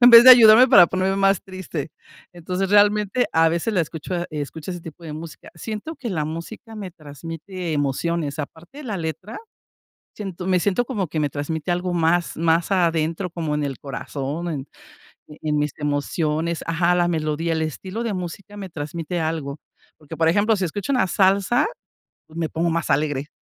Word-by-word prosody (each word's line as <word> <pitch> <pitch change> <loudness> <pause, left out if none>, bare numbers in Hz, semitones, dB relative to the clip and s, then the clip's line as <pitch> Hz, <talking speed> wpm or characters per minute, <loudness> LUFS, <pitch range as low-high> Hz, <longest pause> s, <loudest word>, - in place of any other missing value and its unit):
en 245 - +9
vez 235 0 +11
de 255 - +12
ayudarme, 240 0 +9
para 205 -9 +8
ponerme 190 +2 0
más 195 -1 +3
triste. 185 -6 -6 0.4
Entonces, 180 +2 -3
realmente, 210 +3 +3
a 165 0 +5
veces 170 +7 -1
la 180 - +3
escucho 160 +3 -6 0.2
escucho 150 +2 -5
ese 175 -1 -5
tipo 165 +1 -11
de 155 - -6
música. 160 0 -10
Siento 220 - -6
que 270 -4 -5
la 160 -5 -1
música 170 - -7
me 200 -3 -6
transmite 165 +3 -6
emociones, 145 +2 -1
aparte, 165 - -8
la 215 -5 -3
letra, 175 +6 -5 0.8
siento 190 -4 -6
me 185 -1 +3
siento 205 +6 +1
como 210 -7 -2
que 155 +1 -3
me 150 -1 +1
transmite 155 +4 -3
algo 180 +1 -1
más, 170 +1 +1
más 165 +2 +1
adentro, 170 -1 +1
como 160 -3 -2
en 150 - -1
el 135 -3 -4
corazón, 140 +3 -5
en 145 -4 -4 0.6
e 150 - -13
en 150 -1 0
mis 150 0 0
emociones. 155 +3 -1
Ajá, 170 +1 +2
la 175 -1 +2
melodía, 160 0 -1
el 160 0 0
estilo 185 - -5
de 230 -3 -2
música 185 +3 -6
me 195 -2 -6
transmite 165 +2 -4
algo. 155 -3 -3 0.4
Porque, 155 +1 -10
por 160 0 +3
ejemplo, 205 +5 +3
si 190 - -1
escucho 195 - -3
una 250 -7 +3
salsa, 195 - +3 0.6
me 160 0 -3
pongo 170 +1 0
más 165 0 -1
alegre. 145 -2 0
170 Hz, 180 wpm, -22 LUFS, 155-195 Hz, 0.8 s, de